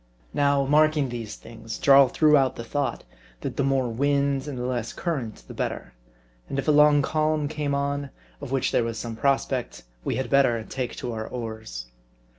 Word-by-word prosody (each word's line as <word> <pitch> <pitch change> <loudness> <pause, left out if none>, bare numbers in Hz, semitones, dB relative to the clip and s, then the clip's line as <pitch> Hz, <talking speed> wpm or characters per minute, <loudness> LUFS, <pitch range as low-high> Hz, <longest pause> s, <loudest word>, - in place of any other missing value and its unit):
Now, 140 -1 +2
marking 150 -1 +3
these 115 -3 -5
things, 115 -1 -9
Jarl 140 -1 +7
threw 150 +4 +4
out 135 -2 +3
the 115 - -6
thought, 140 +4 -2 0.4
that - - -4
the 140 - 0
more 135 -2 +1
wind, 140 +3 0
and 140 -3 -5
the 125 - -3
less 120 -3 -2
current, 125 - -4
the - - -9
better; - - -4 0.6
and - - -3
if 135 - -2
a - - +5
long 150 -1 +6
calm 155 0 0
came 150 -2 -2
on, 140 0 -2 0.3
of 140 -3 -7
which 135 -2 +1
there - - +2
was 115 0 -3
some 115 -1 -5
prospect, 135 0 -1 0.2
we - - -1
had 130 -2 -2
better 125 -5 +3
take 125 +1 -4
to 120 - -4
our 110 0 -4
oars. 110 - -6
135 Hz, 190 wpm, -25 LUFS, 120-145 Hz, 0.6 s, Jarl